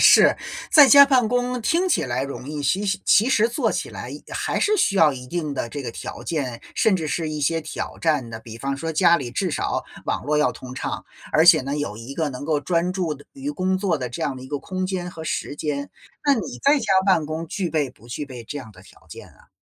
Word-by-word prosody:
是。 - - +7 0.3
在 295 -3 +9
家 280 +3 +10
办 255 -5 +3
公 245 0 0
听 345 +10 +1
起 - - +2
来 125 +1 -1
容 140 0 -6
易， 150 -1 -4
其 190 +9 +1 0.2
其 225 +5 +5
实 230 -3 +3
做 235 - 0
起 - - -3
来， - - -7
一 - - -8
还 - - -1
是 425 0 +3
需 200 - +2
要 155 -5 +5
一 125 -1 -8
定 155 -1 -3
的 120 - -3
这 145 +3 -6
个 120 - -4
条 - - -7
件， 130 -8 -3
甚 215 -3 +3
至 160 -4 -2
是 160 +1 -1
一 150 -1 -4
些 165 +3 +1
挑 155 - -6
战 150 -7 +1
的。 110 - -6
比 115 0 -10
方 135 +1 -2
说 160 +3 -4
家 170 +1 +5
里 120 - -5
至 185 +8 -1
少 - - -2 0.2
网 - - -2
络 150 +1 +1
要 125 -4 +2
通 125 0 -10
畅， - - -4 0.3
而 160 - +5
且 175 - +8
呢， 140 +2 -3
有 145 -8 -3
一 115 +5 -8
个 160 -1 -1
能 135 +1 -7
够 150 -2 0
专 175 +2 0
注 180 -5 -2
的 145 0 -15
于 280 +1 -5
工 185 -8 0
作 185 -4 0
的 125 -1 -3
这 120 - -6
样 135 - -1
的 130 - -9
一 130 - -10
个 145 - -2
空 185 +3 -3
间 180 -2 -3
和 160 -2 -9
时 145 -2 -3
间， 145 -2 -3 0.3
那 285 -1 +5
你 225 - -5
在 285 +1 +5
家 225 - -5 0.2
办 170 -6 +3
公 160 +2 -4
具 180 +2 -2
备 150 -4 0
不 120 - -20
具 145 +5 -4
备 125 -4 -9
这 145 +5 -6
样 115 -5 -10
的 90 - -16
条 - - -20
件 - - -11
啊？ - - -23
155 Hz, 275 characters per minute, -23 LUFS, 140-190 Hz, 0.3 s, 家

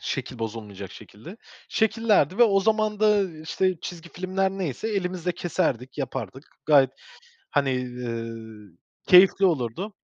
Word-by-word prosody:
şekil 130 -3 -4
bozulmayacak 105 -4 -6
şekilde 110 - -12 0.3
şekillerdi 220 - +2
ve 240 - +7
o 200 -4 +4
zaman 215 0 +1
da, 215 - +4
ııı, 195 -7 +1
işte 185 +2 -1
çizgi 170 -1 -8
filmler 190 +2 -1
neyse 190 - -4
elimizle 180 -4 -2
keserdik, 150 -8 -2
yapardık. 130 - -5 0.2
Gayet, 140 -4 +5 0.6
hani, 140 -3 +1
ııı, 115 -5 -7 0.3
keyifli 190 +1 +7
olurdu. 170 - -1
165 Hz, 125 wpm, -25 LUFS, 120-195 Hz, 0.6 s, ve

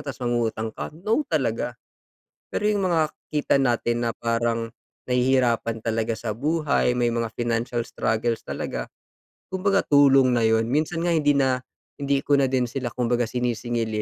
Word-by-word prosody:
tapos 140 -3 -6
mangungutang 115 -2 -1
ka, - - -5
no 220 - 0
talaga. - - -1 0.7
Pero - - -3
yung 200 -3 +1
mga 160 -3 +1 0.2
kita 150 -2 +1
natin 120 -2 +1
na - - 0
parang 115 0 -1 0.3
nahihirapan 125 -3 +1
talaga 115 0 -1
sa 110 -1 -4
buhay, 145 0 +1
may 120 -1 +1
mga 115 0 -1
financial 120 0 -1
struggles 115 0 -1
talaga, - - -4 0.6
kumbaga 195 +1 +1
tulong 135 -2 +5
na 120 - +2
yun. 110 0 +2
Minsan 155 +3 0
nga 175 - +1
hindi 145 -2 +3
na 130 -2 +2 0.4
hindi 140 -1 0
ko 145 - +2
na 140 - +3
din 125 -2 +1
sila 120 -1 -4
kumbaga 120 -1 0
sinisingil, 120 -1 -2
125 Hz, 155 wpm, -24 LUFS, 115-145 Hz, 0.7 s, tulong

